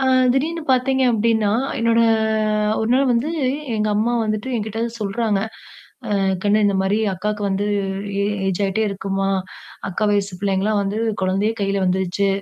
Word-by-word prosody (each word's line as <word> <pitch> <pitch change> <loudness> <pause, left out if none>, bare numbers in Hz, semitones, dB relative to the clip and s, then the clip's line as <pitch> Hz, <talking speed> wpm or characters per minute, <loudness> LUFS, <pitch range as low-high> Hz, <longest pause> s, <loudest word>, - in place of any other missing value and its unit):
அ - - -1 0.3
திடீர்னு 320 +5 -1
பார்த்தீங்க 265 +1 +2
அப்டின்னா, 220 -2 +2 0.3
என்னோட 230 0 +3 0.8
ஒரு 220 - -1
நாள் 270 +1 +3
வந்து 245 +6 +1 0.4
எங்க 215 0 0
அம்மா 230 +3 +1
வந்துட்டு 215 +4 -2
என்கிட்ட 220 0 -3
வந்து 235 0 -4
சொல்றாங்க. 210 0 0 0.8
"அ - - +2 0.3
கண்ணு 210 +1 +3
இந்த 200 -1 +2
மாரி 195 +2 +1 0.2
அக்காக்கு 210 +3 -3
வந்து 195 +1 -1 0.5
ஏ - - +1 0.2
ஏஜ் 190 +1 -1
ஆயிட்டே 200 +3 0
இருக்குமா. 195 0 -2 0.6
அக்கா 200 +4 -1
வயசு 200 -3 -1
பிள்ளைங்கலாம் 200 +1 +1
வந்து 200 +2 -2 0.2
குழந்தையே 195 +4 +1
கையில 195 -1 0
வந்துருச்சு". 190 +2 0
210 Hz, 150 wpm, -21 LUFS, 195-230 Hz, 0.8 s, என்னோட